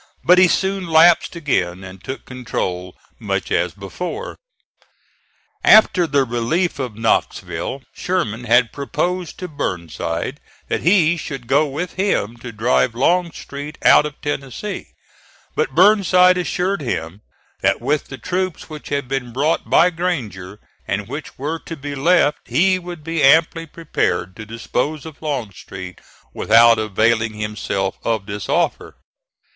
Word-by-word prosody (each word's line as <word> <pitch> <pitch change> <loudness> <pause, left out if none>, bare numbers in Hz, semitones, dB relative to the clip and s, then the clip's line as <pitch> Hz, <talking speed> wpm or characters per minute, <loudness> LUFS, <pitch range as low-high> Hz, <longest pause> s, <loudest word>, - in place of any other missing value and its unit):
But 180 +1 +6
he 185 - +7
soon 190 +1 0
lapsed 165 +2 +5
again 95 - -1
and 95 0 -11
took 130 - -6
control 90 -8 -4 0.2
much - - -3
as - - 0
before. 180 - -6 1.3
After 195 -5 +6
the 140 -2 +2
relief 125 +9 -1
of 125 -5 -4
Knoxville 115 +3 -1
Sherman 125 - -2
had 120 -1 +3
proposed 175 +5 -3
to 180 - -5
Burnside 85 - -4 0.3
that - - -1
he 175 -2 +4
should 135 -6 -6
go 145 +5 +3
with 160 +6 -4
him 185 - 0
to 120 0 -8
drive 115 +1 +1
Longstreet 150 -1 -1
out 150 - +7
of 150 - -12
Tennessee; 145 - -4 0.7
but 130 - -1
Burnside 185 -1 +5
assured 180 +1 -1
him 95 - -4 0.4
that - - +2
with 140 +5 0
the 135 - -8
troops 185 -1 -3
which 155 -1 -8
had 140 -2 -2
been 135 -2 -3
brought 145 +7 0
by 180 - +5
Granger, 110 - -4 0.3
and 100 0 -2
which 145 +4 -7
were 155 +5 -3
to 165 - -8
be 145 +1 -6
left, 150 +2 +3
he 185 +9 +3
would 175 -3 -9
be 165 0 -2
amply 160 +4 +4
prepared 90 - -2
to 110 -1 -9
dispose 125 +6 -3
of 155 -3 -11
Longstreet 100 - -6 0.3
without 115 +1 +5
availing 110 +1 +1
himself 105 -2 -3
of 110 -3 -1
this 105 -1 -6
offer. - - 0
140 Hz, 140 wpm, -20 LUFS, 115-170 Hz, 1.3 s, he